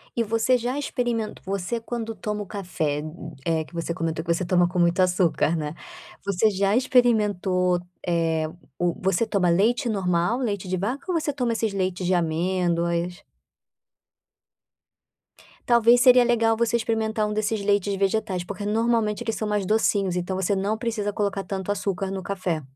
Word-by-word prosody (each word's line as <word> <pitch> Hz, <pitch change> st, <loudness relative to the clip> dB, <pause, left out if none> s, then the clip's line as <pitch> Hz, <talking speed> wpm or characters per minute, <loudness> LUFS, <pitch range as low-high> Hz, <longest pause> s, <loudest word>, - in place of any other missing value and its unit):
E 235 Hz, -, +1 dB
você 230 Hz, +3 st, +2 dB
já 250 Hz, +4 st, -2 dB
experimen 240 Hz, -6 st, -2 dB
você 195 Hz, +4 st, -2 dB
quando 225 Hz, -1 st, -4 dB
toma 210 Hz, -1 st, -4 dB
o -, -, -11 dB
café, 170 Hz, -7 st, -2 dB, 0.4 s
eh, 160 Hz, -1 st, +1 dB
que -, -, -20 dB
você 170 Hz, 0 st, -3 dB
comentou 160 Hz, -1 st, -2 dB
que 170 Hz, -, -1 dB
você 170 Hz, +2 st, 0 dB
toma 175 Hz, -1 st, +3 dB
com 180 Hz, -, -5 dB
muito 175 Hz, +1 st, +2 dB
açúcar, 180 Hz, -3 st, +2 dB
né, 150 Hz, -1 st, -3 dB, 0.5 s
você 200 Hz, +2 st, +2 dB
já 200 Hz, +1 st, +1 dB
experimentou, 205 Hz, -8 st, +2 dB, 0.3 s
eh, 165 Hz, -2 st, +1 dB, 0.3 s
o 175 Hz, -1 st, +1 dB
você 190 Hz, +3 st, +1 dB
toma 190 Hz, -5 st, +1 dB
leite 230 Hz, +8 st, +2 dB
normal, 185 Hz, +2 st, +1 dB
leite 205 Hz, -7 st, -2 dB
de 185 Hz, -, 0 dB
vaca 260 Hz, -, -3 dB
ou 335 Hz, -, +1 dB
você 295 Hz, -2 st, -2 dB
toma 245 Hz, -4 st, -1 dB
esses 225 Hz, -2 st, -1 dB
leites 185 Hz, -1 st, -2 dB
de 185 Hz, -, +2 dB
amêndoas? 170 Hz, +1 st, 0 dB, 2.5 s
Talvez 235 Hz, 0 st, +5 dB
seria 250 Hz, -1 st, +7 dB
legal 230 Hz, -2 st, +2 dB
você 235 Hz, 0 st, +1 dB
experimentar 220 Hz, -1 st, 0 dB
um 210 Hz, -, -2 dB
desses 215 Hz, 0 st, -1 dB
leites 200 Hz, -1 st, +1 dB
vegetais, 195 Hz, -2 st, 0 dB
porque 200 Hz, +2 st, -6 dB
normalmente 225 Hz, 0 st, +1 dB
eles 225 Hz, -1 st, -2 dB
são 215 Hz, -, -3 dB
mais 210 Hz, -2 st, 0 dB
docinhos. 200 Hz, -3 st, +1 dB
Então, 180 Hz, +2 st, -2 dB
você 190 Hz, +1 st, 0 dB
não 205 Hz, +3 st, -1 dB
precisa 220 Hz, -4 st, -2 dB
colocar 200 Hz, -1 st, -1 dB
tanto 195 Hz, 0 st, -3 dB
açúcar 195 Hz, -1 st, -2 dB
no 190 Hz, -1 st, -4 dB
café. 185 Hz, -5 st, -2 dB
200 Hz, 165 wpm, -24 LUFS, 180-225 Hz, 2.5 s, seria